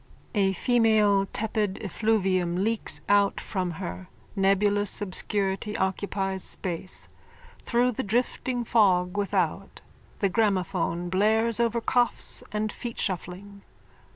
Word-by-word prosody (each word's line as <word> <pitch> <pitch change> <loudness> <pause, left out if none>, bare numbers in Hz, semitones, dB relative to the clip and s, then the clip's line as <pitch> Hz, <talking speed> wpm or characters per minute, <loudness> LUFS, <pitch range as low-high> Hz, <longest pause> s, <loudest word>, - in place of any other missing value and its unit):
_(A 195 -3 +2
female 215 -5 +3
tepid 210 -2 -1
effluvium 190 -4 0
leaks 225 +1 0
out 200 0 +3
from 185 -3 -3
her. 90 - -6 0.3
Nebulous 200 +1 +3
obscurity 200 +1 -2
occupies 195 0 -2
space. 185 0 -4 0.6
Through 245 +1 +2
the 225 - -3
drifting 245 +3 -1
fog 185 -6 +2
without 195 -2 -1 0.4
the 200 - +1
gramophone 185 -4 0
blares 220 +4 +2
over 235 0 +1
coughs 240 -1 +1
and 210 0 -2
feetshuffling.) 200 -3 -4
200 Hz, 100 wpm, -26 LUFS, 190-220 Hz, 0.6 s, female